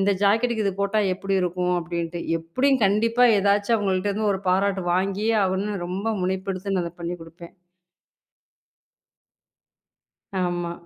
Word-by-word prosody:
இந்த 195 Hz, +1 st, +3 dB
ஜாக்கெட்டுக்கு 220 Hz, +2 st, +2 dB
இது 195 Hz, -, -1 dB
போட்டா 200 Hz, +2 st, +1 dB
எப்படி 195 Hz, +1 st, -2 dB
இருக்கும் 180 Hz, 0 st, 0 dB
அப்படின்ட்டு. 170 Hz, 0 st, -4 dB, 0.2 s
எப்படியும் 255 Hz, +10 st, +1 dB
கண்டிப்பா 230 Hz, +5 st, +3 dB
எதாச்சும் 205 Hz, +3 st, +2 dB
அவங்கள்ட்ட 195 Hz, -1 st, 0 dB
இருந்து 210 Hz, +1 st, 0 dB
ஒரு 190 Hz, -, -3 dB
பாராட்டு 190 Hz, 0 st, +1 dB
வாங்கியே 195 Hz, +4 st, 0 dB
ஆகணும். 190 Hz, +1 st, -2 dB
ரொம்ப 190 Hz, +4 st, -4 dB, 0.2 s
முனைப்பெடுத்து 190 Hz, +1 st, -2 dB
நான் 180 Hz, -, +1 dB
அத 170 Hz, -, -6 dB
பண்ணி 170 Hz, +1 st, -3 dB
குடுப்பேன். 170 Hz, +1 st, -13 dB, 2.9 s
ஆமா. 175 Hz, -1 st, -2 dB
195 Hz, 125 wpm, -24 LUFS, 180-205 Hz, 2.9 s, இந்த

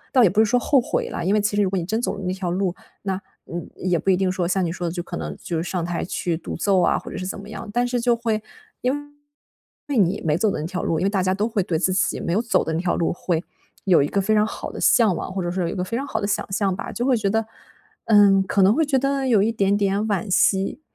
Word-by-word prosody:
倒 255 Hz, -, +6 dB
也 180 Hz, -, +5 dB
不 210 Hz, +3 st, +2 dB
是 -, -, +6 dB
说 245 Hz, +3 st, +2 dB
后 270 Hz, +2 st, +3 dB
悔 -, -, -2 dB
了， -, -, -4 dB
因 200 Hz, -, +3 dB
为 210 Hz, -, +3 dB
其 205 Hz, 0 st, 0 dB
实 205 Hz, -, +3 dB
如 190 Hz, -, +2 dB
果 190 Hz, -, -2 dB
你 170 Hz, -, -2 dB
真 220 Hz, +5 st, -1 dB
走 240 Hz, -, -1 dB
了 200 Hz, -, -7 dB
那 180 Hz, -, -1 dB
条 185 Hz, -2 st, -3 dB
路， 185 Hz, -1 st, 0 dB, 0.3 s
那， 190 Hz, -1 st, -2 dB, 0.3 s
嗯， 175 Hz, +1 st, -6 dB
也 180 Hz, -2 st, 0 dB
不 195 Hz, -, 0 dB
一 185 Hz, -, +4 dB
定 190 Hz, -1 st, +1 dB
说 180 Hz, -2 st, -1 dB
像 185 Hz, +1 st, +1 dB
你 165 Hz, -, -1 dB
说 175 Hz, 0 st, -4 dB
的 165 Hz, -, -2 dB
就 175 Hz, -1 st, -3 dB
可 -, -, -7 dB
能， 75 Hz, -2 st, -5 dB
就 170 Hz, -, -3 dB
是 175 Hz, -, -4 dB
上 180 Hz, -3 st, -2 dB
台 175 Hz, -1 st, -2 dB
去 175 Hz, -2 st, -2 dB
独 -, -, -6 dB
奏 190 Hz, 0 st, +2 dB
啊， -, -, +3 dB
或 -, -, -9 dB
者 -, -, -6 dB
是 185 Hz, -, -4 dB
怎 190 Hz, -, -4 dB
么 205 Hz, -, -11 dB
样。 220 Hz, 0 st, -7 dB
但 245 Hz, +3 st, +1 dB
是 245 Hz, 0 st, -1 dB
就 240 Hz, 0 st, +3 dB
会 225 Hz, -2 st, -1 dB, 0.4 s
因 250 Hz, +1 st, +2 dB, 1.0 s
为 280 Hz, -, -1 dB
你 195 Hz, +1 st, +2 dB
没 155 Hz, -1 st, +2 dB
走 215 Hz, +3 st, +2 dB
的 170 Hz, -, -3 dB
那 155 Hz, -, -3 dB
条 185 Hz, +1 st, -4 dB
路， 160 Hz, -, 0 dB
因 190 Hz, -, +1 dB
为 -, -, +2 dB
大 195 Hz, -3 st, 0 dB
家 185 Hz, 0 st, +1 dB
都 210 Hz, +3 st, 0 dB
会 215 Hz, -4 st, 0 dB
对 165 Hz, -3 st, -1 dB
自 185 Hz, +2 st, +1 dB
己 185 Hz, -, +1 dB
没 170 Hz, -, -2 dB
有 215 Hz, +5 st, +2 dB
走 235 Hz, -, +1 dB
的 160 Hz, -, -2 dB
那 160 Hz, -, -1 dB
条 180 Hz, -1 st, 0 dB
路 170 Hz, -, 0 dB
会， 175 Hz, -1 st, -2 dB, 0.4 s
有 175 Hz, -7 st, +5 dB
一 145 Hz, -, 0 dB
个 200 Hz, -, 0 dB
非 215 Hz, +3 st, +1 dB
常 210 Hz, -, +4 dB
好 -, -, -6 dB
的 -, -, -7 dB
向 220 Hz, -6 st, +4 dB
往， 185 Hz, -, -5 dB
或 190 Hz, -, -2 dB
者 175 Hz, -, -2 dB
说 185 Hz, +1 st, -2 dB
有 -, -, -1 dB
一 -, -, -4 dB
个 180 Hz, -, -1 dB
非 230 Hz, +5 st, -3 dB
常 275 Hz, -, -2 dB
好 220 Hz, -5 st, -2 dB
的 200 Hz, -, -1 dB
想 205 Hz, -, -2 dB
象 195 Hz, -2 st, +1 dB
吧。 -, -, -6 dB
就 240 Hz, +2 st, -2 dB
会 260 Hz, -3 st, +4 dB
觉 200 Hz, -3 st, 0 dB
得 225 Hz, 0 st, 0 dB, 0.6 s
嗯， 200 Hz, -3 st, +6 dB
可 195 Hz, +1 st, +1 dB
能 200 Hz, +4 st, +5 dB
会 320 Hz, -, +2 dB
觉 270 Hz, -2 st, +2 dB
得， 275 Hz, 0 st, 0 dB
有 220 Hz, -5 st, +4 dB
一 225 Hz, +2 st, +1 dB
点 200 Hz, -2 st, +2 dB
点 200 Hz, 0 st, +1 dB
惋 205 Hz, +1 st, -1 dB
惜。 195 Hz, +7 st, +2 dB
195 Hz, 335 characters per minute, -23 LUFS, 180-220 Hz, 1.0 s, 倒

